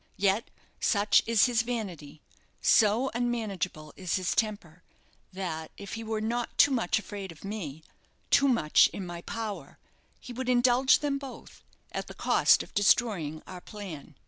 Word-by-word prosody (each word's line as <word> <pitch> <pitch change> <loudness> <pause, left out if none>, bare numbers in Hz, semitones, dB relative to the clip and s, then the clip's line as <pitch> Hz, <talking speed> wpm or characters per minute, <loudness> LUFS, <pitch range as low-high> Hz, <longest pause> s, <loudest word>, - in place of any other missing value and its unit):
Yet, 200 +3 +1 0.3
such 205 0 +3
is 230 -3 +5
his 245 -2 +2
vanity, 185 -12 -6 0.4
so 225 +5 +3
unmanageable 215 -10 -3
is 185 -3 -2
his 185 -2 0
temper, 200 -7 -2 0.5
that 165 -4 -5
if 200 - -8
he 225 - -5
were 220 -1 -2
not 235 +2 -3
too 285 - +6
much 230 -8 +1
afraid 200 -3 -6
of 165 +3 -13
me, 165 -8 -6 0.5
too 280 - +5
much 230 - +4
in 195 - -7
my 175 -1 -7
power, 220 +1 -6 0.4
he 245 - -9
would 255 +1 -4
indulge 250 +2 +4
them 285 -2 -1
both 275 -2 -11 0.3
at - - -4
the - - -10
cost - - +4
of - - -17
destroying 195 -7 +1
our 180 -1 -9
plan. 175 -9 -9
210 Hz, 155 wpm, -28 LUFS, 180-240 Hz, 0.5 s, too